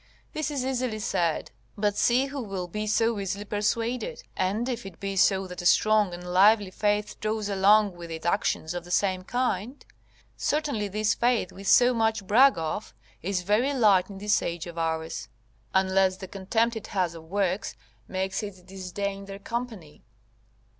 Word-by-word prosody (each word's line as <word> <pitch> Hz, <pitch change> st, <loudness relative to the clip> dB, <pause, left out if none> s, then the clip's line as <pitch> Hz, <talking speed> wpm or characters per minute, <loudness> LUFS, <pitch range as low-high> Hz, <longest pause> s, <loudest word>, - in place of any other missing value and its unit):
This 310 Hz, -2 st, -2 dB
is 275 Hz, -4 st, -2 dB
easily 255 Hz, -4 st, -1 dB
said, 170 Hz, -6 st, -1 dB, 0.3 s
but 205 Hz, 0 st, +1 dB
see 245 Hz, +5 st, +3 dB
who 275 Hz, 0 st, -5 dB
will 195 Hz, -5 st, -4 dB
be 210 Hz, +4 st, -4 dB
so 225 Hz, +1 st, +2 dB
easily 200 Hz, +1 st, -3 dB
persuaded; 230 Hz, -, -2 dB
and 205 Hz, +6 st, 0 dB
if 240 Hz, -2 st, -3 dB
it 195 Hz, -4 st, -10 dB
be 195 Hz, 0 st, -3 dB
so 195 Hz, 0 st, +3 dB
that 180 Hz, -1 st, -7 dB
a -, -, -8 dB
strong 215 Hz, -2 st, +4 dB
and 175 Hz, 0 st, -7 dB
lively 195 Hz, +3 st, +4 dB
faith 210 Hz, +1 st, -1 dB
draws 215 Hz, -1 st, -2 dB
along 200 Hz, 0 st, +4 dB
with 170 Hz, -1 st, -9 dB
it 160 Hz, 0 st, -7 dB
actions 175 Hz, -3 st, 0 dB
of 175 Hz, -1 st, -4 dB
the 175 Hz, -, -13 dB
same 185 Hz, 0 st, +1 dB
kind, 245 Hz, +2 st, -2 dB, 0.5 s
certainly 290 Hz, -9 st, -1 dB
this 215 Hz, +2 st, +1 dB
faith 240 Hz, -5 st, +1 dB
we 195 Hz, -, -11 dB
so 245 Hz, +5 st, +5 dB
much 220 Hz, -3 st, 0 dB
brag 255 Hz, +6 st, +5 dB
of, 160 Hz, -9 st, -4 dB, 0.3 s
is 185 Hz, 0 st, -1 dB
very 230 Hz, +9 st, +2 dB
light 205 Hz, -7 st, +4 dB
in 195 Hz, -, -8 dB
this 205 Hz, +1 st, +1 dB
age 170 Hz, 0 st, -3 dB
of 170 Hz, -1 st, -7 dB
ours, 160 Hz, 0 st, -3 dB, 0.4 s
unless 190 Hz, 0 st, +2 dB
the 190 Hz, -, -8 dB
contempt 225 Hz, +5 st, 0 dB
it 220 Hz, -, -6 dB
has 180 Hz, -4 st, -1 dB
of 165 Hz, -1 st, -11 dB
works 195 Hz, -, -1 dB, 0.3 s
makes 190 Hz, +2 st, -2 dB
it 190 Hz, -4 st, -8 dB
disdain 195 Hz, +1 st, -5 dB
their 195 Hz, 0 st, -8 dB
company. 215 Hz, -7 st, -6 dB
200 Hz, 175 wpm, -27 LUFS, 185-225 Hz, 0.5 s, so